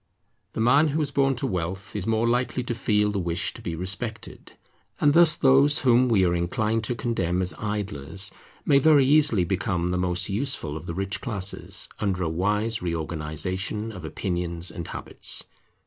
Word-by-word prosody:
The - - -5
man 130 +7 +4
who 155 +2 -1
is 145 - -2
born 135 -1 +2
to 125 - -3
wealth 95 -2 -4
is 105 -1 -3
more 115 +1 +1
likely 125 +1 0
to 120 - -3
feel 105 -2 +1
the 100 - -2
wish 85 -2 -1
to - - -11
be 85 - -4
respected. 100 +6 -4 0.5
And 145 - +4
thus 170 -1 +5
those 140 +2 +4
whom 125 0 +4
we 100 -5 +3
are 85 - +1
inclined 110 +6 -1
to 120 - -2
condemn 95 -8 -1
as 90 0 -1
idlers 100 -3 -1 0.3
may 140 -2 +5
very 145 -1 +5
easily 140 -8 +4
become 90 -1 -1
the 90 0 -1
most 90 -1 0
useful 105 - -2
of 80 - -8
the 85 - -4
rich 95 +1 -3
classes, 100 -6 -1
under 95 -3 -1
a 80 - -1
wise 105 +7 -1
reorganization 85 +6 -3
of 90 -5 -10
opinions 85 +1 -3
and 85 - -7
habits. - - +1
100 Hz, 180 wpm, -25 LUFS, 90-120 Hz, 0.5 s, thus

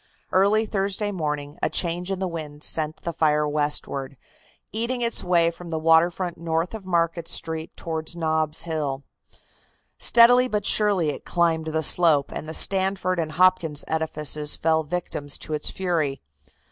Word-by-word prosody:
Early 205 +4 +3
Thursday 200 0 -2
morning 150 -4 -4
a - - +1
change 175 +1 -2
in 195 - -2
the 190 0 -2
wind 155 -3 -7
sent 155 -1 0
the 170 - -3
fire 150 -1 +1
westward, 145 -2 -2 0.5
eating 235 +3 -3
its 235 0 +2
way 170 -2 +2
from 170 0 -11
the 160 - -3
water 165 +2 +4
front 175 -1 -5
north 165 +2 -2
of 210 -4 -8
Market 170 -1 0
Street 160 0 -4
toward 160 0 -3
Nob's 155 -2 -1
Hill. 150 -5 -3 1.0
Steadily 245 +2 +5
but 210 -4 -2
surely 200 -7 +4
it - - -9
climbed 165 -2 0
the 160 0 -1
slope, 155 -3 +3
and 155 - -6
the 160 - -2
Stanford 190 -2 +2
and 155 -2 -3
Hopkins 170 -4 +2
edifices 150 -2 -1
fell 160 0 +1
victims 150 -3 -3
to 155 - -6
its 150 - +1
fury. 165 -7 -2
165 Hz, 160 wpm, -24 LUFS, 155-185 Hz, 1.0 s, Steadily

